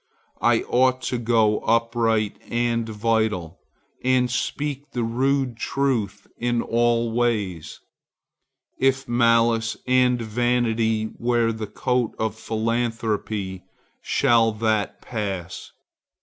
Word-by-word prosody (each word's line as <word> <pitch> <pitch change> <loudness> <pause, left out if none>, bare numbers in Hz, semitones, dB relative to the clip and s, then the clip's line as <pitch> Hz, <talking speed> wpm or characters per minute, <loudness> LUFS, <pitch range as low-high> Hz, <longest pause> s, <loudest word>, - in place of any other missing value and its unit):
I - - +3
ought 130 +1 +2
to 125 - 0
go 110 -2 +2
upright 115 -2 +1
and 115 -1 0
vital, 105 -6 -1 0.4
and 125 -1 +2
speak 145 +2 -3
the 120 - -1
rude 130 +1 0
truth 120 -8 -1
in 120 0 0
all 120 0 +1
ways. 105 -9 -1 1.0
If 135 0 +1
malice 115 -1 +2
and 125 -1 +3
vanity 115 -1 0
wear 120 -1 +2
the 110 -1 -5
coat 125 +3 -1
of 110 -2 -1
philanthropy, 110 -4 -2 0.4
shall 115 -1 +3
that 110 -1 -1
pass? 100 -7 -5
115 Hz, 100 wpm, -23 LUFS, 110-120 Hz, 1.0 s, I